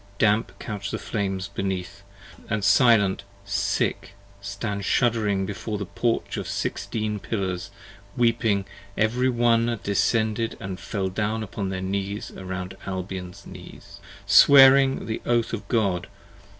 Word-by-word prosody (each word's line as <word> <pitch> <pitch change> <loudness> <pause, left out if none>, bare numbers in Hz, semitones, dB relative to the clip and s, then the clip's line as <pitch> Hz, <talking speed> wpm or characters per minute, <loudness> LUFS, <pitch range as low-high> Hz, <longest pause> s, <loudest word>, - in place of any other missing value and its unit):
Damp 110 +1 +1
couch 100 -3 -5
the - - -3
flames 95 -3 -3
beneath, 95 0 -4 0.5
and 105 -2 -1
silent, 100 -3 +4 0.2
sick, - - -1 0.3
stand 100 +1 -4
shuddering 105 -3 +1
Before 100 +2 -4
the 100 - -4
Porch 115 +5 -1
of - - -4
sixteen 105 -1 -3
pillars: 95 -3 -3 0.5
weeping 115 -4 +2 0.3
every 120 +4 +2
one 120 -1 +2
Descended 110 +3 0
and 95 -1 -6
fell 95 +2 -3
down 110 +3 -2
upon 100 -1 -4
their 95 -1 -3
knees 100 +2 -3
round 95 0 -6
Albion's 95 0 -6
knees, - - -12 0.3
Swearing 135 -1 +7
the 110 - -4
Oath 120 -1 0
of 110 - -5
God! 100 -7 0
105 Hz, 125 wpm, -24 LUFS, 95-115 Hz, 0.5 s, Swearing